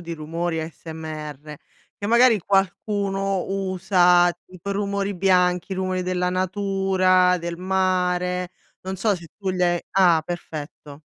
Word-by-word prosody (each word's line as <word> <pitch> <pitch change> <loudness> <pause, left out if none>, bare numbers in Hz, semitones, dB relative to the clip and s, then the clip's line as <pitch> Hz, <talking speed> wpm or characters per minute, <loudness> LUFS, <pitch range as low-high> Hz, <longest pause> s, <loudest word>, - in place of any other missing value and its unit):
di 170 -1 -7
rumori 165 +1 -3
ASMR, 155 -2 -8 0.4
che 205 - -4
magari 235 -1 +5
qualcuno 195 0 0
usa, 185 -2 +3 0.2
tipo, 185 +2 -6
rumori 200 0 -2
bianchi, 180 0 +2
rumori 185 -1 -2
della 180 0 -1
natura, 185 -1 +2
del 170 0 -5
mare, 180 -1 0 0.3
non 190 +1 -5
so 210 +2 +1
se 170 -3 -10
tu 195 -2 -2
gli 180 -1 -1
hai 175 -1 +2
ah 175 -4 +4
perfetto. 150 -3 -8
180 Hz, 125 wpm, -23 LUFS, 170-195 Hz, 0.4 s, magari